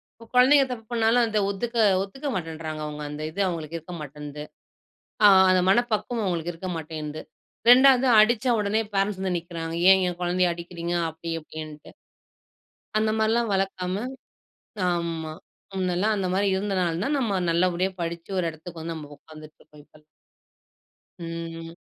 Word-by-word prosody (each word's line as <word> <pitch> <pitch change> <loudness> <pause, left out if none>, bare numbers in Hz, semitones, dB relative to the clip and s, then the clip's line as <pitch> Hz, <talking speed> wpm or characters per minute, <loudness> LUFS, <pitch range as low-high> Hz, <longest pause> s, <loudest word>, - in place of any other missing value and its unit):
இப்ப 230 - -16
குழந்தைங்க 270 +2 +6
தப்பு 225 -3 -6
பண்ணாலும் 230 +1 +3
அதை 215 -1 0
ஒதுக்க 235 +4 -4 0.3
ஒத்துக்க 270 +9 -7
மாட்டேன்றாங்க. 160 -3 -5
அவங்க, 150 0 -7
அந்த 150 +1 -6
இது 200 - -3
அவங்களுக்கு 165 -2 -4
இருக்க 175 +2 -9
மாட்டேங்குது. 150 0 -8 0.8
ஆ - - +11 0.2
அந்த 185 0 +4
மனப்பக்குவம் 235 0 +1
அவங்களுக்கு 175 -2 -2
இருக்க 185 +3 -6
மாட்டேங்குது. 155 -1 -6 0.5
2வது 260 0 +7
அடிச்ச 220 +2 +3
உடனே 210 +1 +1
பரென்ட்ஸ் 195 0 0
வந்து 185 -2 -1
நிக்கறாங்க. 165 -1 -6 0.2
ஏன் 190 - +7
எங்க 180 -1 -1
குழந்தைய 180 0 +2
அடிக்கறீங்க? 170 0 -5 0.2
அப்டி 160 +1 -7
இப்டின்ட்டு. 155 -1 -9 1.1
அந்த 215 0 +2
மாரிலாம் 225 +1 +2
வளர்க்காம. 190 -1 -1 1.0
ஆமா. 165 -2 -3 0.4
முன்னெல்லாம் 190 +3 0
அந்த 195 -2 -1
மாரி 200 +1 +1
இருந்தனால 185 -4 -1
தான் 290 +3 0
நம்ம 205 -8 0
நல்லபடியா 180 +2 +1
படிச்சு 170 +2 -5
ஒரு 180 - 0
இடத்துக்கு 165 +1 -10
வந்து 165 +1 -4
நம்ம 150 -2 -9
உக்காந்துட்டு 155 0 -14
இருக்கோம். 150 -1 -17
இப்ப, 155 - -21 1.2
ம். 165 -1 -7
180 Hz, 145 wpm, -25 LUFS, 165-210 Hz, 1.2 s, ஆ